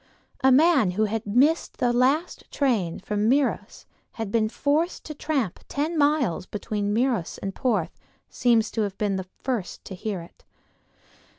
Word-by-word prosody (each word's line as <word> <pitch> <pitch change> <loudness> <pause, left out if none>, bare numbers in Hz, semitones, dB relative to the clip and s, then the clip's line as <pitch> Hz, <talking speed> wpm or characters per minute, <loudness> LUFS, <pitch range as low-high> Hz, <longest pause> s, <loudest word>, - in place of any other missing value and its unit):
A 265 - +6
man 285 - +5
who 215 - +3
had 215 0 -3
missed 275 +10 +2
the 245 -3 +1
last 275 +8 +1
train 220 - 0
from 210 +1 -1
Meiros 275 +2 0
and - - -45 0.2
had 225 -3 -5
been 215 -1 +2
forced 300 +8 0
to 305 - -6
tramp 280 - -2
the - - -24
ten 305 +4 -2
miles 285 - +1
between 205 0 -3
Meiros 230 -5 0
and 195 0 -5
Porth 210 -10 -1 0.3
seems 235 -3 +2
to 225 - -1
have 200 -2 -2
been 205 -2 0
the 190 -1 -5 0.2
first 240 -9 -3
to - - -7
hear 190 0 -4
it. 170 - -18
230 Hz, 170 wpm, -25 LUFS, 205-280 Hz, 0.3 s, A